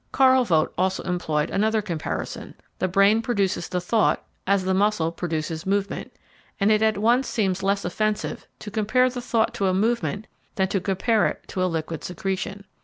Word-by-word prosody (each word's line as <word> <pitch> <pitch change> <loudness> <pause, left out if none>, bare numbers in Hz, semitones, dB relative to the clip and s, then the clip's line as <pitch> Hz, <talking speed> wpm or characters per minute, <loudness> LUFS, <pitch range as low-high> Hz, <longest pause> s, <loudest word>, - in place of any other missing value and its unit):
Karl 260 -1 +5
Vogt 160 -8 +1
also 190 +1 0
employed 160 -4 -1
another 220 +2 +2
comparison: 170 -7 -4 0.2
the 185 - +1
brain 195 +4 +4
produces 200 -7 -1
the 180 - -1
thought 215 +5 +1 0.2
as 200 -1 +3
the 190 0 +1
muscle 190 -4 +2
produces 160 -2 -3
movement, 200 0 -1 0.5
and 200 +1 +3
it 215 0 +3
at 220 -2 +2
once 240 +5 +2
seems 195 -4 0
less 200 0 0
offensive 215 +4 -2
to 210 - -9
compare 250 +5 +2
the 250 0 -5
thought 230 -1 +1
to 200 -5 0
a 185 - +2
movement 220 0 0 0.3
than 190 -3 +1
to 195 -1 0
compare 205 +4 +2
it - - -5
to 185 - -1
a 185 - +2
liquid 160 -1 -4
secretion. 195 +3 -4
200 Hz, 180 wpm, -24 LUFS, 185-220 Hz, 0.5 s, Karl